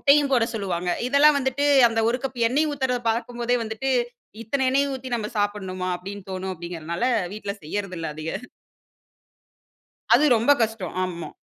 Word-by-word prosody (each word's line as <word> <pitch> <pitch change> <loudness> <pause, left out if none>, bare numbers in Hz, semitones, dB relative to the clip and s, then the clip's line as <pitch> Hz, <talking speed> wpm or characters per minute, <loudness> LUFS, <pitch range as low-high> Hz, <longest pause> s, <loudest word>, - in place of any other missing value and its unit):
முட்டையும் 285 0 +4
போட 240 -4 +4
சொல்லுவாங்க. 180 -4 -2 0.2
இதெல்லாம் 285 +2 +5
வந்துட்டு, 270 +1 -1 0.2
அந்த 225 0 0
1 245 +2 0
கப் 260 -2 -4
எண்ணெய் 295 +6 +2
ஊத்துறத 260 -3 0
பாக்கும் 240 +1 -2
போதே 245 +1 +2
வந்துட்டு, 220 +4 -3 0.5
இத்தனை 265 +4 -1
எண்ணெய் 280 +1 +2
ஊத்தி 260 -1 -7
நம்ப 210 -2 -4
சாப்பிடணுமா? 190 -3 -2
அப்டின்னு 195 +1 -9
தோணும் 190 0 -3
அப்டிங்குறதுனால 170 +1 -6 0.3
வீட்ல 205 -2 -4
செய்யறது 190 +2 -4
இல்ல 160 - -3
அதிக. 155 +1 -5 1.8
அது 305 - +5
ரொம்ப 230 +5 +2
கஷ்டம். 220 -5 -2
ஆமா. 170 -2 -5
225 Hz, 150 wpm, -24 LUFS, 185-265 Hz, 1.8 s, இதெல்லாம்